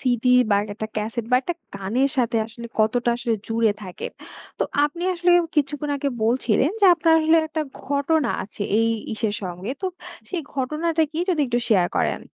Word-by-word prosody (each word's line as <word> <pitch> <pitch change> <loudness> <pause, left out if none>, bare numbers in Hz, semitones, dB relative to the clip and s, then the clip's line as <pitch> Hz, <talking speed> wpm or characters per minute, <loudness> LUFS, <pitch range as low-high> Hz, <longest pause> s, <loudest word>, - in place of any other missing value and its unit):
CD 250 -1 +1 0.2
বা 200 - +5 0.2
একটা 215 +1 -4
cassette 220 +2 -2
বা 250 - +6
একটা 350 - -2 0.2
গানের 220 +8 0
সাথে 240 -3 +1
আসলে 235 +1 -9
কতটা 235 +3 +2
আসলে 235 -1 -1
জুড়ে 225 -1 +2
থাকে। 185 -3 -6 0.5
তো - - +1 0.2
আপনি 315 +4 -3
আসলে 355 +1 +2 0.3
কিছুক্ষণ 295 0 0
আগে 280 0 -1 0.2
বলছিলেন 245 +4 +2
যে, 405 - +5
আপনার 330 -1 +2
আসলে 320 +1 +4
একটা 310 0 -2 0.2
ঘটনা 285 +2 +1
আছে 205 +1 -7 0.2
এই 225 - +3 0.3
ইসের 215 -2 -1
সঙ্গে 180 +5 -5
তো - - +1 0.4
সেই 360 - -2
ঘটনাটা 310 +5 0
কি 315 - -4
যদি 340 -4 +2
একটু 240 -1 0
শেয়ার 190 -6 +4
করেন? - - 0
250 Hz, 175 wpm, -23 LUFS, 220-305 Hz, 0.5 s, বা